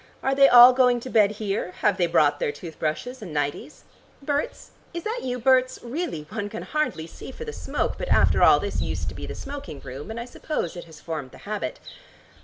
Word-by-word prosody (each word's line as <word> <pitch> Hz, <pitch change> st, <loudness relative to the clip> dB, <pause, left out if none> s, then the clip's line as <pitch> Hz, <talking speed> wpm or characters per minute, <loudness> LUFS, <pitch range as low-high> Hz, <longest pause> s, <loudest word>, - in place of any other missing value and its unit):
Are 270 Hz, -, +2 dB
they 275 Hz, 0 st, +6 dB
all 245 Hz, +1 st, +10 dB
going 250 Hz, -1 st, +4 dB
to 255 Hz, -, -7 dB
bed 210 Hz, -2 st, +4 dB
here? 200 Hz, -3 st, -3 dB
Have 205 Hz, -3 st, +3 dB
they 175 Hz, -, +2 dB
brought 150 Hz, -3 st, +3 dB
their -, -, 0 dB
tooth 160 Hz, +2 st, -10 dB
brushes 235 Hz, +12 st, -3 dB
and 190 Hz, -6 st, -8 dB
nighties? 145 Hz, -, -3 dB, 0.4 s
Berts, 285 Hz, +1 st, -3 dB, 0.2 s
is 340 Hz, -, -4 dB
that 450 Hz, +3 st, -2 dB
you, 250 Hz, -1 st, -3 dB
Berts? 255 Hz, +1 st, +3 dB
Really 250 Hz, -, -4 dB
one 205 Hz, +4 st, -5 dB
can 220 Hz, -, -6 dB
hardly 305 Hz, -, -2 dB
see 170 Hz, -, -10 dB
for 470 Hz, -, -8 dB
the 450 Hz, -, -6 dB
smoke, -, -, -2 dB
but -, -, -4 dB
after -, -, +4 dB
all -, -, +7 dB
this -, -, -3 dB
used -, -, -3 dB
to -, -, -9 dB
be -, -, -7 dB
the -, -, -6 dB
smoking 280 Hz, -, -7 dB
room, 135 Hz, +7 st, -8 dB
and 225 Hz, +1 st, -5 dB
I 235 Hz, -, -5 dB
suppose 245 Hz, -, -4 dB
it 175 Hz, -, -8 dB
has 160 Hz, -2 st, -14 dB
formed 155 Hz, -5 st, -5 dB
the -, -, -15 dB
habit. 210 Hz, 0 st, -4 dB
225 Hz, 220 wpm, -25 LUFS, 165-265 Hz, 0.4 s, all